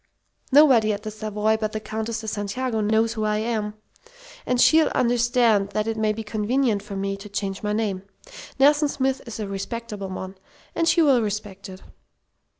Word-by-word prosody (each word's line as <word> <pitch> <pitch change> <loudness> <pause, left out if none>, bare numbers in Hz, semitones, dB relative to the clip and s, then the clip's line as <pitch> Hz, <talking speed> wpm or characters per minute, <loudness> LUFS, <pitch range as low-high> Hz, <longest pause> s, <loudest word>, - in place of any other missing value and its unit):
Nobody 260 -7 +6
at 205 +1 -6
the 215 - -5
Savoy 215 0 -1
but 215 -1 -3
the 215 - -2
Countess 220 +1 -4
de 220 - -8
Santiago 220 +3 -2
knows 220 +2 +2
who 220 - -3
I 210 0 +1
am, 215 -1 -2 0.7
and 250 -1 +1
she'll 315 +5 +5
understand 235 -4 +2
that 215 +1 0
it 225 0 -2
may 220 -1 +1
be 220 +1 -5
convenient 220 +1 0
for 205 0 -8
me 195 0 -2
to 205 +1 -11
change 195 -1 -4
my 210 - -2
name. 210 -3 -1 0.6
Nelson 290 +2 +4
Smith 265 -1 -1
is 230 - -7
a 210 - -3
respectable 205 0 -5
one, 190 0 -7 0.3
and 330 0 0
she'll 285 -8 +4
respect 205 -2 -5
it! 185 0 -11
215 Hz, 175 wpm, -23 LUFS, 205-235 Hz, 0.7 s, Nobody